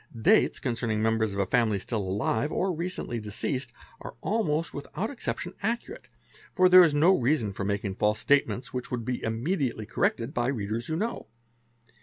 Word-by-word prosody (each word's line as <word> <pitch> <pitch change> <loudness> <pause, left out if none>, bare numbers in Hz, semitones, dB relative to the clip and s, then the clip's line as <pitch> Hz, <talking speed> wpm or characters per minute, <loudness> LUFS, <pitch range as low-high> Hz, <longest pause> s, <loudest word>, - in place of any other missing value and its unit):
Dates 110 - +4
concerning 115 -3 -1
members 110 -2 +1
of - - -3
a 100 - +2
family 110 0 +2
still 105 +3 -3
alive 105 +8 -1
or 185 0 0
recently 170 -8 -3
deceased, 120 +4 -3 0.3
are - - -9
almost 170 -7 0
without 175 - -4
exception 175 - -4
accurate, 235 - -3 0.5
for 185 -2 +6
there 185 0 +9
is 160 -4 +4
no 170 +6 +5
reason 120 - +1
for 100 - -4
making 100 0 -2
false 105 +2 +1
statements 140 -3 +1
which 125 -1 -4
would 120 -3 -3
be 125 0 -2
immediately 120 - -1
corrected 115 +4 -1
by 120 0 0
readers 115 -3 -2
who 160 - -2
know. 225 +7 -3
125 Hz, 170 wpm, -27 LUFS, 110-165 Hz, 0.5 s, there